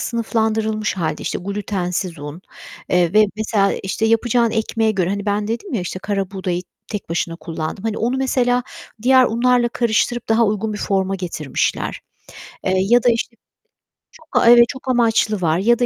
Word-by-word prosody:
sınıflandırılmış 220 Hz, -2 st, -1 dB
hâlde, 160 Hz, -4 st, -2 dB
işte, -, -, -2 dB
glutensiz 185 Hz, -3 st, -3 dB
un, 145 Hz, +3 st, -8 dB, 0.5 s
eee, 175 Hz, -2 st, +2 dB
ve, 215 Hz, +1 st, +6 dB
mesela, 210 Hz, -2 st, +1 dB
işte, 195 Hz, +3 st, -1 dB
yapacağın 230 Hz, +1 st, +2 dB
ekmeğe 220 Hz, 0 st, 0 dB
göre, 185 Hz, -4 st, 0 dB
hani, 200 Hz, +1 st, -3 dB
ben 205 Hz, +1 st, 0 dB
dedim 245 Hz, -, -4 dB
ya, 220 Hz, -, 0 dB
işte, 180 Hz, +1 st, -5 dB
karabuğdayı 190 Hz, -2 st, -3 dB, 0.3 s
tek 210 Hz, -2 st, -5 dB
başına 165 Hz, 0 st, -2 dB
kullandım. 165 Hz, +3 st, -5 dB
Hani, 220 Hz, -1 st, -2 dB
onu, 240 Hz, +3 st, 0 dB
mesela, 250 Hz, -2 st, +1 dB, 0.4 s
diğer 260 Hz, +1 st, +6 dB
unlarla 240 Hz, +1 st, +2 dB
karıştırıp 235 Hz, 0 st, 0 dB
daha 225 Hz, +1 st, +4 dB
uygun 215 Hz, +1 st, -1 dB
bir 210 Hz, -, -5 dB
forma 195 Hz, -1 st, 0 dB
getirmişler, 165 Hz, -7 st, -2 dB, 0.7 s
eee, 185 Hz, -, +1 dB
ya 230 Hz, +6 st, +3 dB
da, 245 Hz, -, +5 dB
işte, 230 Hz, 0 st, -1 dB, 0.8 s
çok, 315 Hz, -, -19 dB, 0.2 s
a 230 Hz, -, +6 dB
Evet, 240 Hz, 0 st, +8 dB
çok 265 Hz, 0 st, -8 dB
amaçlı 225 Hz, -4 st, +2 dB
var 160 Hz, -2 st, +2 dB
ya 230 Hz, +6 st, +3 dB
da, 245 Hz, -, +3 dB
215 Hz, 165 wpm, -20 LUFS, 190-235 Hz, 0.8 s, Evet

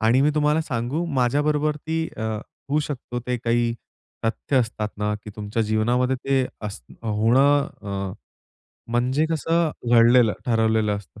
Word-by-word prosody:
आणि 115 Hz, +4 st, +4 dB
मी 150 Hz, -, +4 dB
तुम्हाला 150 Hz, +1 st, +2 dB
सांगू? 130 Hz, +4 st, -2 dB
माझ्याबरोबर 150 Hz, +4 st, +1 dB
ती 160 Hz, +2 st, -2 dB
अ, 110 Hz, -, -5 dB, 0.5 s
होऊ 145 Hz, +2 st, +2 dB
शकतो, 125 Hz, -4 st, -5 dB
ते 125 Hz, 0 st, 0 dB
काही 115 Hz, 0 st, +1 dB, 0.5 s
तथ्य 115 Hz, +4 st, -1 dB
असतात 115 Hz, -4 st, 0 dB
ना 105 Hz, 0 st, 0 dB
की 105 Hz, -, -7 dB
तुमच्या 105 Hz, +2 st, -2 dB
जीवनामध्ये 120 Hz, +4 st, +1 dB
ते 135 Hz, 0 st, +1 dB, 0.2 s
अस 100 Hz, -, -7 dB, 0.2 s
होणं 125 Hz, +7 st, +3 dB, 0.2 s
अ, 100 Hz, -2 st, -4 dB, 0.8 s
म्हणजे 125 Hz, +6 st, +1 dB
कसं 165 Hz, +1 st, +1 dB, 0.2 s
घडलेलं, 120 Hz, -1 st, +6 dB
ठरवलेलं 110 Hz, -3 st, +2 dB
असतं. 100 Hz, +1 st, -12 dB
120 Hz, 140 wpm, -23 LUFS, 110-145 Hz, 0.8 s, घडलेलं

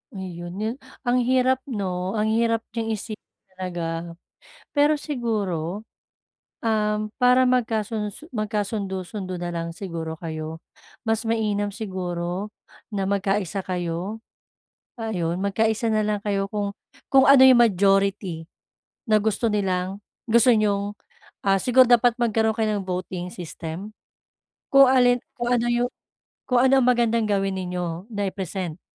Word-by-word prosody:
Ayun 175 Hz, -2 st, -6 dB
'no. 215 Hz, +2 st, -2 dB, 0.4 s
Ang 245 Hz, 0 st, +2 dB
hirap 260 Hz, 0 st, +3 dB
'no, 190 Hz, -5 st, -3 dB
ang 215 Hz, 0 st, +1 dB
hirap 230 Hz, 0 st, +1 dB
niyang 225 Hz, -1 st, -2 dB
isipin 215 Hz, +1 st, -7 dB, 0.4 s
talaga. 170 Hz, -2 st, -4 dB, 0.6 s
Pero 295 Hz, +1 st, +4 dB
siguro, 215 Hz, -, -3 dB, 0.7 s
um, 215 Hz, -2 st, 0 dB
para 250 Hz, 0 st, +5 dB
magkasunod 220 Hz, -4 st, 0 dB
su 310 Hz, -, -11 dB
magkasundo-sundo 200 Hz, -3 st, -3 dB
na 175 Hz, -, -3 dB
lang 170 Hz, -1 st, -4 dB
siguro 165 Hz, -3 st, -5 dB
kayo, 160 Hz, -1 st, -5 dB, 0.5 s
mas 225 Hz, +1 st, +1 dB
mainam 210 Hz, -2 st, 0 dB
siguro 185 Hz, -1 st, -4 dB, 0.4 s
na 195 Hz, -2 st, -1 dB
magkaisa 195 Hz, -1 st, -1 dB
kayo. 180 Hz, +4 st, -3 dB, 0.8 s
Ayun, 180 Hz, -7 st, -2 dB
magkaisa 220 Hz, +3 st, +1 dB
na 215 Hz, 0 st, +2 dB
lang 210 Hz, -1 st, -1 dB
kayo 200 Hz, -1 st, 0 dB
kung 205 Hz, -1 st, -2 dB, 0.4 s
kung 265 Hz, -1 st, +7 dB
ano 275 Hz, -1 st, +8 dB
yung 255 Hz, -2 st, +7 dB
majority 195 Hz, -4 st, +1 dB, 0.6 s
na 215 Hz, -, +5 dB
gusto 220 Hz, +2 st, +1 dB
nilang 190 Hz, -1 st, -1 dB, 0.3 s
gusto 235 Hz, +2 st, +5 dB
niyong, 205 Hz, -2 st, +1 dB, 0.5 s
ah, 195 Hz, 0 st, +4 dB
siguro 255 Hz, +1 st, +6 dB
dapat 240 Hz, -1 st, +5 dB
magkaroon 220 Hz, -2 st, +2 dB
kayo 215 Hz, -2 st, +1 dB
ng 195 Hz, -, -6 dB
voting 180 Hz, 0 st, -3 dB
system. 170 Hz, +3 st, -7 dB, 0.8 s
Kung 275 Hz, 0 st, +8 dB
alin, 245 Hz, -1 st, +5 dB, 0.2 s
kung 240 Hz, 0 st, -2 dB
ano 240 Hz, -1 st, +2 dB
yung 240 Hz, +1 st, +1 dB, 0.6 s
kung 250 Hz, -1 st, +4 dB
ano 265 Hz, +1 st, +5 dB
ang 245 Hz, -, +2 dB
magandang 235 Hz, -2 st, +3 dB
gawin 195 Hz, -1 st, +1 dB
ninyo 180 Hz, 0 st, -4 dB
na 205 Hz, -2 st, -2 dB
i-present, 185 Hz, -3 st, -5 dB
205 Hz, 130 wpm, -24 LUFS, 185-230 Hz, 0.8 s, ano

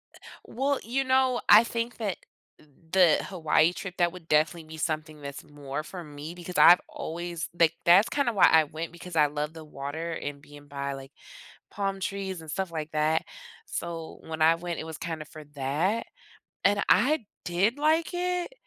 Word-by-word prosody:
Eh -, -, -14 dB, 0.3 s
Well, 275 Hz, +2 st, -1 dB
you 265 Hz, +4 st, -1 dB
know, 260 Hz, -1 st, +2 dB
I 210 Hz, +3 st, +9 dB
think 235 Hz, +1 st, -3 dB
that 210 Hz, -5 st, -2 dB, 0.7 s
the 180 Hz, -4 st, +5 dB
Hawaii 165 Hz, -2 st, +2 dB
trip, 180 Hz, -1 st, -7 dB
that 175 Hz, -1 st, +2 dB
would 175 Hz, -2 st, -12 dB
definitely 160 Hz, +2 st, +2 dB
be 160 Hz, 0 st, -9 dB
something 155 Hz, -1 st, -3 dB
that's 140 Hz, 0 st, -7 dB
more 145 Hz, 0 st, -6 dB
for 180 Hz, +1 st, -8 dB
me 150 Hz, +2 st, -8 dB
because 180 Hz, 0 st, -7 dB
I've 175 Hz, +1 st, +8 dB
always 170 Hz, +1 st, -5 dB
like 165 Hz, -1 st, +5 dB
that's 180 Hz, +5 st, +6 dB
kinda 275 Hz, -5 st, 0 dB
why 195 Hz, -, +6 dB
I 160 Hz, -1 st, +6 dB
went 160 Hz, +3 st, -6 dB
because 170 Hz, 0 st, -10 dB
I 150 Hz, -1 st, +5 dB
love 150 Hz, +2 st, -4 dB
the 160 Hz, -1 st, -10 dB
water 150 Hz, +4 st, -5 dB
and 145 Hz, -2 st, -5 dB
being 145 Hz, 0 st, -15 dB
by, 140 Hz, 0 st, -4 dB
like, 135 Hz, 0 st, -9 dB, 0.6 s
palm 195 Hz, -1 st, -2 dB
trees 190 Hz, -2 st, -4 dB
and 160 Hz, -, -8 dB
stuff 190 Hz, +1 st, -3 dB
like 155 Hz, -1 st, -5 dB
that. 155 Hz, +1 st, +1 dB, 0.4 s
So 165 Hz, -, -6 dB
when 160 Hz, -1 st, -6 dB
I 165 Hz, +1 st, +6 dB
went, 170 Hz, 0 st, -5 dB
it -, -, -4 dB
was 160 Hz, -1 st, -7 dB
kinda 160 Hz, -2 st, -5 dB
for 155 Hz, 0 st, -11 dB
that. 155 Hz, +12 st, 0 dB, 0.6 s
And 200 Hz, 0 st, +3 dB
I 260 Hz, +5 st, +4 dB, 0.2 s
did 195 Hz, +9 st, +1 dB
like 315 Hz, +4 st, +2 dB
it, 360 Hz, +5 st, -2 dB
170 Hz, 185 wpm, -27 LUFS, 155-200 Hz, 0.7 s, I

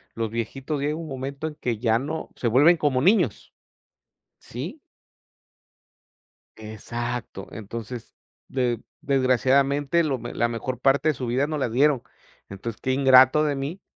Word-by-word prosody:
los 115 Hz, -1 st, -2 dB
viejitos 135 Hz, +6 st, -3 dB
llega 150 Hz, +2 st, 0 dB
un 165 Hz, 0 st, -6 dB
momento 135 Hz, +1 st, -5 dB
en 155 Hz, -, -7 dB
que 120 Hz, -6 st, -2 dB
ya 115 Hz, 0 st, +2 dB
no 150 Hz, +5 st, -5 dB
Se 120 Hz, -, -2 dB
vuelven 145 Hz, +9 st, +6 dB
como 145 Hz, -5 st, +1 dB
niños. 135 Hz, -, +2 dB, 0.9 s
¿Sí? -, -, -7 dB, 1.8 s
Exacto. 110 Hz, 0 st, -6 dB
Entonces, 115 Hz, +2 st, -7 dB, 0.3 s
de 120 Hz, -3 st, -1 dB, 0.2 s
desgraciadamente, 135 Hz, +4 st, +2 dB
lo 140 Hz, -4 st, 0 dB
me -, -, -7 dB
la 120 Hz, -, +1 dB
mejor 120 Hz, +1 st, -4 dB
parte 135 Hz, +4 st, +3 dB
de -, -, +2 dB
su 125 Hz, -2 st, -5 dB
vida, 130 Hz, +4 st, +1 dB
nos 155 Hz, -1 st, -3 dB
la 130 Hz, -, 0 dB
dieron. 135 Hz, +2 st, +3 dB, 0.5 s
Entonces, 105 Hz, +3 st, -7 dB
qué 130 Hz, -, 0 dB
ingrato 130 Hz, +2 st, +6 dB
de 145 Hz, -2 st, 0 dB
mí, 140 Hz, +8 st, -5 dB
130 Hz, 145 wpm, -24 LUFS, 115-145 Hz, 1.8 s, vuelven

